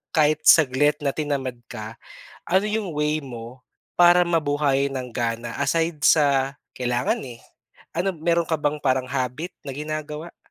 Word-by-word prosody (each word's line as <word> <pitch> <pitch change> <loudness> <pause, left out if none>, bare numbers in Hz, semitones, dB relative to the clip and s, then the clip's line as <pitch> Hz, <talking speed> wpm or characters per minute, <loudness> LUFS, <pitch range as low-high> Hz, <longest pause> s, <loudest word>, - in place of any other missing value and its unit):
kahit 155 0 +3
saglit 145 -1 +5
na 140 - +1
tinamad 140 -5 -2
ka, 110 +1 -8 0.5
ano 190 +4 +3
yung 210 -5 -2
way 150 +1 0
mo 125 -1 -9 0.4
para 175 0 +7
mabuhayan 145 -4 +1
ng 125 - -7
gana 115 -1 -2
aside 165 -1 +1
sa 140 -2 +3 0.2
kailangan, 125 0 0
eh. 120 -3 -10 0.6
Ano 190 +2 0
meron 170 +1 +1
ka 160 -1 -2
bang 150 0 0
parang 130 -2 0
habit 135 +7 -3
na 135 - -5
ginagawa? 155 +2 -6
145 Hz, 145 wpm, -23 LUFS, 130-160 Hz, 0.6 s, para